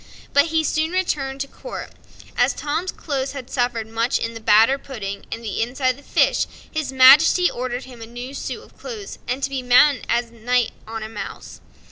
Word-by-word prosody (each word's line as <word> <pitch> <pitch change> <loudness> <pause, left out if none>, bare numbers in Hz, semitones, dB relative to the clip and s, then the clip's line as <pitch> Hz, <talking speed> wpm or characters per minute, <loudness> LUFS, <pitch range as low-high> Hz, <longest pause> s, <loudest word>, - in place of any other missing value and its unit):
But 285 +1 +5
he 320 0 +1
soon 315 +2 0
returned 275 -7 -1
to 275 - -3
court. - - -8 0.4
As - - +3
Tom's 325 +5 -2
clothes 275 -3 -3
had 265 -2 -8
suffered 245 -3 0
much 230 +3 0
in 230 - -3
the 225 - -7
batter 225 +5 +5
pudding 200 -8 -7
and 230 - -5
the 215 -2 -2
inside 255 +3 +1
of 255 - -9
the - - -14
fish, - - +2 0.2
his 310 -4 -2
Majesty 285 +7 +7
ordered 250 +1 -4
him 250 -3 -12
a 225 - -8
new 245 +3 -8
suit - - -5
of - - -21
clothes, 435 -5 -7
and 255 +3 -2
to 275 - +1
be 270 -1 -2
mounted 250 +3 +4
as 235 0 0
a - - -20
knight 245 +1 +1 0.2
on 225 0 -5
a - - -5
mouse. 225 - -8
255 Hz, 205 wpm, -22 LUFS, 235-285 Hz, 0.4 s, Majesty